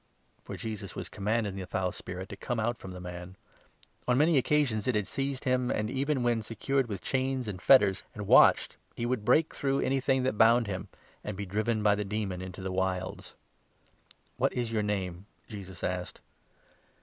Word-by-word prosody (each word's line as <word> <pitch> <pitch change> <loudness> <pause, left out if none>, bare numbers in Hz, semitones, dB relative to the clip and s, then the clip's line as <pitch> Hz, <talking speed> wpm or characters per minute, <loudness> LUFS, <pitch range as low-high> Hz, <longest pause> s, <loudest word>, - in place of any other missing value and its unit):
For - - -7
Jesus 105 -4 -6
was - - -5
commanding 105 -1 -1
the 95 -2 -5
foul 90 -1 -1
spirit 90 +1 -7
to - - -6
come 120 -2 -3
out 115 +2 -1
from 95 - -9
29 - - -7
the 90 0 -6
man. 90 +1 -10 0.7
On 125 0 +3
many 155 +3 +4
occasions 130 -6 +1
it 130 - +2
had 105 -2 +1
seized 135 +2 -3
him, 125 -2 +1
and, 105 +2 -1
even 135 0 0
when 120 -2 +2
secured 130 +4 -1
with 100 -4 -5
chains 130 -2 0
and 95 -3 -5
fetters, 100 -8 +5
and 105 -2 -5
watched, - - +6 0.2
he 120 - -2
would 120 -3 -1
break 145 +8 +3
through 135 -1 0
anything 135 0 +1
that 130 -5 -1
bound 115 +1 +6
him, 95 -3 -4 0.4
and 105 -2 -5
be 100 - -3
driven 110 +3 -1
by 105 -1 +5
the 105 +1 -1
demon 100 -3 -3
into 95 0 -7
the 95 - -3
Wilds. 95 0 -2 0.5
" - - -30
What - - +2
is 120 -2 -2
your 110 -2 +1
name? 95 -2 -3
" - - -38
Jesus 95 -5 -9
asked. 90 0 -3
110 Hz, 195 wpm, -30 LUFS, 95-125 Hz, 0.7 s, watched